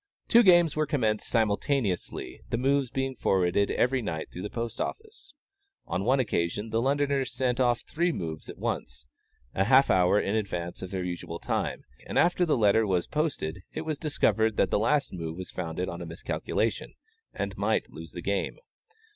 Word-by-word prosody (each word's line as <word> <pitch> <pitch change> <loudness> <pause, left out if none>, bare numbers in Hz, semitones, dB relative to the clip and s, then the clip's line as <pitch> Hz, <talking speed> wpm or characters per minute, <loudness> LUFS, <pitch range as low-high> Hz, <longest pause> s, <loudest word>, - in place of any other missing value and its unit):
Two 235 - +7
games 175 -6 +5
were 155 0 +1
commenced 110 -7 0
simultaneously, 110 -2 -1
the - - 0
moves 135 +1 +2
being 135 +1 -2
forwarded 95 -1 +2
every 130 +1 +1
night 80 -8 -4
through 90 - -7
the 105 - -4
post 115 -1 -4
office. 435 -5 -6 0.5
On 95 - -2
one 130 +5 +3
occasion 105 -2 -1
the 115 - +1
Londoners 140 0 +1
sent 125 -1 0
off 120 -2 +2
three 170 +2 0
moves 80 - -5
at - - -8
once, - - -4 0.5
half 130 +8 +5
an - - +5
hour 90 +3 +4
in 100 - -1
advance 90 -5 -3
of 95 - -5
their 95 -1 -3
usual 85 -1 -5
time; - - -2 0.2
and - - -3
after 175 0 +3
the 150 - +2
letter 110 0 +4
was 90 -3 +1
posted, 140 - -2
it - - -3
was 155 -2 -3
discovered 110 - +1
that - - +2
the - - +3
last 140 +6 +1
move 85 -2 -5
was 95 - -7
founded 90 0 -3
on 85 0 -5
a 85 - -6
miscalculation, 85 +1 -2 0.4
and - - -4
might - - 0
lose - - -10
the - - -7
game. - - -1
115 Hz, 180 wpm, -28 LUFS, 90-140 Hz, 0.5 s, Two